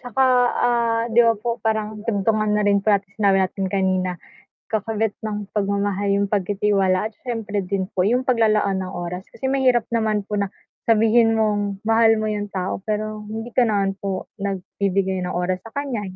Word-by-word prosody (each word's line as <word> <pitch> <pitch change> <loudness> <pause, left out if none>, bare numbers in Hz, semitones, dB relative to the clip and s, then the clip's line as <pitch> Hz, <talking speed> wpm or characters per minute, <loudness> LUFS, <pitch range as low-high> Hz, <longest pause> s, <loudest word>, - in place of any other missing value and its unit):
Tsaka, 250 +1 0 0.4
ah, 235 -1 +1
'di 235 - +6
ba 230 - +4
po 240 - -2 0.2
parang 220 -1 0 0.2
tungtungan 215 0 +1
na 210 - +2
rin 200 0 +4
parang 200 -2 +3
sinabi 200 -3 +3
natin 190 +1 -1
kanina, 185 -1 +1 0.6
kakabit 220 0 -1
ng 215 -1 -2 0.2
pagmamahal 200 0 0
yung 200 0 -1
pagtitiwala 195 -1 +2
at 220 - -16
siyempre 225 -4 -3
din 195 -1 +1
po 185 - -5
yung 250 +1 +2
paglalaan 215 -5 +2
ng 185 - -5
oras 180 +2 -5
kasi - - -18
mahirap 255 -4 +3
naman 220 -2 +1
po - - -6
na 200 - 0 0.4
sabihin 225 +1 +4
mong 210 -2 +1 0.3
mahal 225 0 +5
mo 215 - -1
yung 205 0 -4
tao, 185 +1 -2
pero 215 0 -2
hindi 225 +2 -5
ka 250 - +6
naman 200 -2 +1
po 195 -2 -3 0.2
nagbibigay 195 0 -1
ng 180 0 -3
oras 185 0 -1
sa 225 - -12
kanya. 275 -6 -2
210 Hz, 175 wpm, -22 LUFS, 195-225 Hz, 0.6 s, di